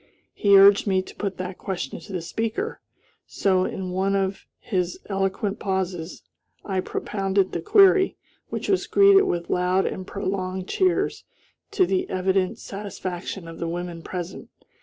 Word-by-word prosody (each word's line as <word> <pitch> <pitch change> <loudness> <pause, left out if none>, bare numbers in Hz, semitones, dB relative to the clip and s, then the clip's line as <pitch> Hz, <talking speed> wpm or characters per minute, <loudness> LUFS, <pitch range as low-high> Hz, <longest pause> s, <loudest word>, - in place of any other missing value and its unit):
He 200 -1 +5
urged 200 +2 +7
me 190 -1 +2
to - - -13
put 195 -3 -3
that 185 0 -5
question 180 -8 -4
to 165 - -12
the 180 -3 -3
speaker; 225 - -3 0.5
so, 185 -2 +1
in 185 -1 -4
one 190 +2 +1
of 195 0 -2
his 180 -4 -2
eloquent 195 +1 -1
pauses, 185 -4 -3 0.4
I 190 -2 -1
propounded 195 0 -1
the - - -3
query, 395 -2 +5 0.3
which - - -4
was 385 -2 +1
greeted 395 0 +6
with 175 -1 -2
loud 180 +1 +2
and 185 0 -4
prolonged 190 -2 -3
cheers, 370 -2 +1 0.5
to 370 - +3
the 370 +1 -1
evident 185 0 0
satisfaction 190 -3 -6
of 165 0 -9
the 170 - -2
women 175 0 -5
present. 180 +1 -6
190 Hz, 150 wpm, -24 LUFS, 185-205 Hz, 0.5 s, urged